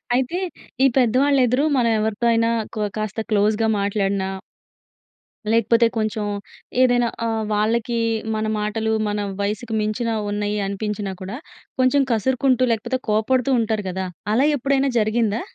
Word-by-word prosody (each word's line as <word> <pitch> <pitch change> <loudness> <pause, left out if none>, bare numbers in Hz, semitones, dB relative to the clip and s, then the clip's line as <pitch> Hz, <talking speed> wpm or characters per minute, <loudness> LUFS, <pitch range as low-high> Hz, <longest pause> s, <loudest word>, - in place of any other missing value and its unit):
అయితే, 260 +8 0 0.4
ఈ - - +7
పెద్దవాళ్ళ 265 +3 +3
ఎదురు 250 +4 +1
మనం 235 -2 +3
ఎవరితో 220 +1 -1
అయినా, 230 0 +2 0.3
కొ 215 - -1 0.2
కాస్త 215 0 -3
క్లోజ్‌‌గా 215 +2 +2
మాట్లాడినా... 200 -1 0 1.2
లేకపోతే 230 +1 +4
కొంచెం 215 -1 -1 0.6
ఏదైనా 245 -1 +4 0.2
ఆహ్, 225 -1 -1
వాళ్ళకి 230 +2 0 0.4
మన 215 - -1
మాటలు, 220 +1 -1
మన 205 0 -1 0.2
వయసుకు 215 +3 -3
మించిన 215 +3 -1 0.2
ఉన్నాయి 205 0 -1
అనిపించినా 200 0 -3
కూడా 195 +6 -5 0.4
కొంచెం 255 +2 +4
కసురుకుంటూ, 255 +3 +2
లేకపోతే 230 +3 -1
కోప్పడుతూ 250 +5 +2
ఉంటారు 215 -2 -1
గదా! 190 +1 -3 0.3
అలా 255 +6 +3
ఎప్పుడైనా 275 +1 +1
జరిగిందా? 220 0 +1
220 Hz, 125 wpm, -22 LUFS, 210-245 Hz, 1.2 s, ఈ